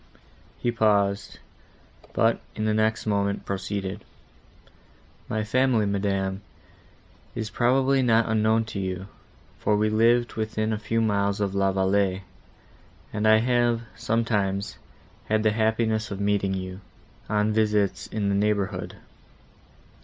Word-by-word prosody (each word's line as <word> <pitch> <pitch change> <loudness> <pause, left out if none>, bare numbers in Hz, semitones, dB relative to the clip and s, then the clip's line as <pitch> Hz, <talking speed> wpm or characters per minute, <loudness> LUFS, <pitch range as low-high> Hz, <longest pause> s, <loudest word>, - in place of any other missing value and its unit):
He 120 - -1
paused, 105 -3 +1 0.8
but, - - +2 0.2
in 110 - -2
the 110 - +2
next 110 +1 +1
moment, 100 -1 0
proceeded. 100 +1 -4 1.3
"My 110 -1 -1
family, 125 -1 +2
madam, 100 -1 -1 0.9
is 110 -2 -4
probably 135 +2 +2
not 115 -2 +3
unknown 110 0 +2
to 100 - -3
you, 95 +1 -4 0.5
for 105 - +1
we 105 +1 +1
lived 115 +2 +3
within 110 0 -2
a 105 - -2
few 115 +1 -1
miles 100 -2 +1
of 100 -2 -1
La 95 0 +2
Vallée, 95 0 +1 0.9
and 105 0 0
I 110 0 +7
have, 120 -1 +2
sometimes, 105 -3 -1 0.5
had 110 0 +1
the 110 - +3
happiness 110 0 0
of 100 - -5
meeting 100 -1 +1
you, 95 +1 -6 0.5
on 105 0 +1
visits 105 -2 +1
in 105 -2 -2
the - - +1
neighbourhood. 100 -1 -1
105 Hz, 125 wpm, -25 LUFS, 100-110 Hz, 1.3 s, I